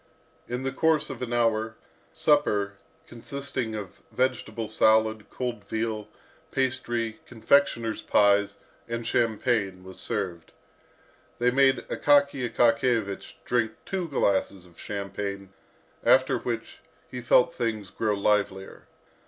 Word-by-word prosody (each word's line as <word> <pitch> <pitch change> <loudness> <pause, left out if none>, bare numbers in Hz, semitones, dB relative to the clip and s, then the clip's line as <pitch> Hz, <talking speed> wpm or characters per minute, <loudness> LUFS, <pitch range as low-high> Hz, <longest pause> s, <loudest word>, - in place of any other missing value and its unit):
In 125 +2 -4
the 135 - -1
course 155 +2 +2
of 130 - -8
an 125 -2 -4
hour, 110 -2 +1 0.4
supper, 145 -11 +2 0.3
consisting 130 -1 -5
of 100 -4 -8
vegetable 120 -3 -1
salad, 110 0 +3
cold 120 -5 -4
veal, 110 +1 -3 0.4
pastry, 120 -4 -1
confectioner's 115 -2 +2
pies, 100 -1 +3 0.3
and 115 0 -4
champagne, 110 -5 0
was 95 0 -11
served. 85 -4 -4 0.8
They 125 +1 +2
made 135 0 +3
Akaky 140 -4 +2
Akakiyevich 115 -3 +1
drink 110 -2 0
two 185 -3 -3
glasses 100 - 0
of 85 -2 -19
champagne, 100 -1 -5 0.5
after - - +4
which - - -5 0.3
he 125 - -7
felt 120 +1 +4
things 110 -5 -3
grow 105 -2 0
livelier. 100 -1 -1
115 Hz, 110 wpm, -26 LUFS, 105-125 Hz, 0.8 s, after